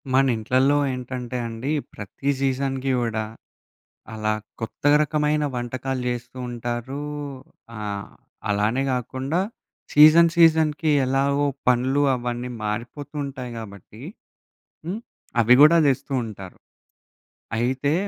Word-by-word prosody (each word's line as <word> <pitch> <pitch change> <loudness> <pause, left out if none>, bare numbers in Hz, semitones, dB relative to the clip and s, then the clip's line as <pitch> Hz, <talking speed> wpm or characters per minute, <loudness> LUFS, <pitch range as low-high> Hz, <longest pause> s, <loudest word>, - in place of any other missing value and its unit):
మన 135 +1 +4
ఇంట్లల్లో 130 +6 +2
ఏంటంటే 125 -1 -5
అండి, 115 +5 -4 0.2
ప్రతి 105 +7 -5
సీజన్‌కి 135 0 0
గూడా, 110 -2 -1 0.9
అలా 110 0 -1 0.3
కొత్త 115 0 -7 0.2
రకమైన 150 0 +1
వంటకాలు 125 +1 -3
జేస్తూ 120 +1 -5
ఉంటారు. 120 +3 -4 0.8
ఆహ్, 100 -1 -5 0.4
అలానే 105 +6 +1
గాకుండా 130 +6 -2 0.5
సీజన్, 155 +3 +8
సీజన్‌కి 160 -2 +4 0.2
ఎలాగో 140 +2 +1 0.2
పనులు 130 +3 +2
అవన్నీ 120 0 -4
మారిపోతూ 120 +8 -5
ఉంటాయి 130 -3 -6
గాబట్టి 110 0 -10 0.8
హ్మ్, 195 +6 -3 0.4
అవి 120 +3 +6
గూడా 155 +3 +8
దెస్తూ 135 0 0
ఉంటారు. 95 -4 -9 1.0
అయితే, 130 +4 0
130 Hz, 100 wpm, -23 LUFS, 120-140 Hz, 1.0 s, సీజన్